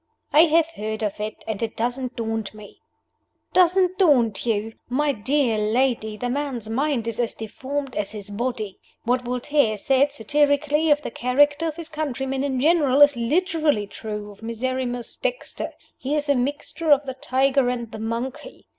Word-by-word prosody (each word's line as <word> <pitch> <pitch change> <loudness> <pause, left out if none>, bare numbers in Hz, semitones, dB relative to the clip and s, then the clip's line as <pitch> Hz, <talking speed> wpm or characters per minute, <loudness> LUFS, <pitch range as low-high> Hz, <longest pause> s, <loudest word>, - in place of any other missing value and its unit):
"I 310 +3 +8
have 325 0 +4
heard 220 -4 -4
of 210 -1 -2
it 215 +1 -5
and 220 -1 -3
it 225 -1 -3
doesn't 245 +2 -2
daunt 225 -2 -3
me." 210 -1 -13 0.7
"Doesn't 370 +1 +4
daunt 245 - +3
you? 225 0 0 0.2
My 290 +4 +1
dear 255 -1 +1
lady, 220 0 0
the 245 - -3
man's 260 -4 -3
mind 250 0 0
is 230 0 -3
as 235 -2 -1
deformed 265 +5 -5
as 205 -1 -2
his 205 -1 -8
body. 215 -3 -3 0.2
What 245 +2 +1
Voltaire 250 -1 +1
said 270 +6 +2
satirically 290 +4 +2
of 295 0 +3
the - - -4
character 290 +7 +2
of 310 - -3
his 335 -1 -6
countrymen 270 -3 -2
in 265 -2 -1
general 290 -2 +3
is 290 -1 +5
literally 300 - +1
true 210 0 -6
of 200 - -17
Miserrimus 245 +1 -3
Dexter. - - -3 0.3
He 275 +3 -1
is 300 0 -1
a - - +6
mixture 290 +5 -2
of 290 0 +5
the 265 - -4
tiger 265 0 +1
and 235 -2 -3
the 220 - -7
monkey. 235 - -5
255 Hz, 170 wpm, -23 LUFS, 225-290 Hz, 0.7 s, I